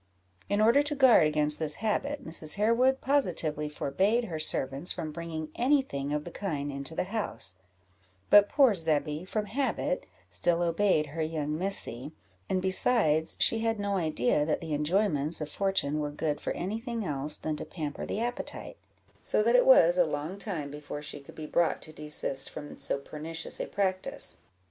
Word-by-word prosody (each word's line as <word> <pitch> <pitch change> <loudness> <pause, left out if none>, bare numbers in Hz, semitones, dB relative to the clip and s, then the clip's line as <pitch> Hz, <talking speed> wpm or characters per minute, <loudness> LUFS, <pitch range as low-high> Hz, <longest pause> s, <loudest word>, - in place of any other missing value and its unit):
In 205 +1 +1
order 235 +6 +5
to 295 0 -1
guard 255 - +6
against 150 0 +1
this 155 -2 -2
habit, 275 +6 -2
Mrs. 160 -1 -3
Harewood 235 +6 +2
positively 165 - 0
forbade 190 - 0
her 170 -8 -5
servants 140 +1 +1
from 160 -3 -4
bringing 160 -1 -6
any 270 +3 +3
thing 140 - -5
of 150 0 -1
the 175 - -8
kind 145 -8 -3
into 140 +3 -3
the - - 0
house; 200 - -4 0.8
but 205 0 +8
poor 270 -6 +5
Zebby, 155 -2 -1
from 210 +2 -2
habit, 230 - -2 0.2
still 165 - +1
obeyed 170 -2 +2
her 155 +3 -5
young 155 -1 -2
Missy, 155 -7 -3 0.4
and, 185 -1 0
besides, 185 -5 +3
she 225 - +4
had 225 -1 -1
no 200 0 -1
idea 155 -5 +1
that 150 0 0
the 160 -2 -5
enjoyments 155 0 0
of 150 -1 -5
fortune 190 -7 0
were 150 -1 -2
good 150 0 -3
for - - -3
any 200 +5 -3
thing 230 -3 -4
else 145 -1 -2
than 155 -1 -3
to - - -5
pamper 150 -4 -6
the - - -3
appetite; 240 +1 -5 0.4
so 210 - +1
that 235 +2 +3
it 250 - +5
was 175 -9 +6
a - - +7
long 155 +6 -4
time 165 -9 -4
before 145 0 -7
she 145 - -2
could 140 - -14
be 155 - -7
brought 170 +2 +1
to 155 - -11
desist 150 -3 +1
from 145 -1 -9
so - - +1
pernicious 155 +3 -3
a - - -3
practice. 190 -2 -2
165 Hz, 180 wpm, -29 LUFS, 150-205 Hz, 0.8 s, but